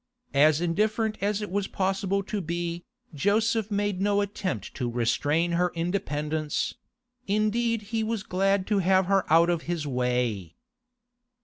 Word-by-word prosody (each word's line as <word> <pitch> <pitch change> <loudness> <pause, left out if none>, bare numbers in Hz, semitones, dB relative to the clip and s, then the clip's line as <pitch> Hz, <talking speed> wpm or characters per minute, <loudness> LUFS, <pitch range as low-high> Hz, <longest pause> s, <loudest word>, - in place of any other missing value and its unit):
As 150 +2 +4
indifferent 215 +5 0
as 205 +1 0
it 205 - -6
was 200 0 -1
possible 195 +1 -1
to 200 +1 -3
be, 170 0 -3 0.3
Joseph 215 +7 +1
made 205 -2 -1
no 205 0 +2
attempt 200 -2 -3
to 125 -3 -2
restrain 145 +8 +1
her 175 +1 +1
independence; 155 -3 -2 0.5
indeed 215 +2 +1
he 225 -1 +1
was 220 -2 -2
glad 195 +1 +1
to 205 -1 +1
have 190 0 +3
her 195 -3 +1
out 165 +2 +6
of 170 -2 -1
his 170 -3 -1
way. 125 - -1
185 Hz, 140 wpm, -27 LUFS, 155-205 Hz, 0.5 s, out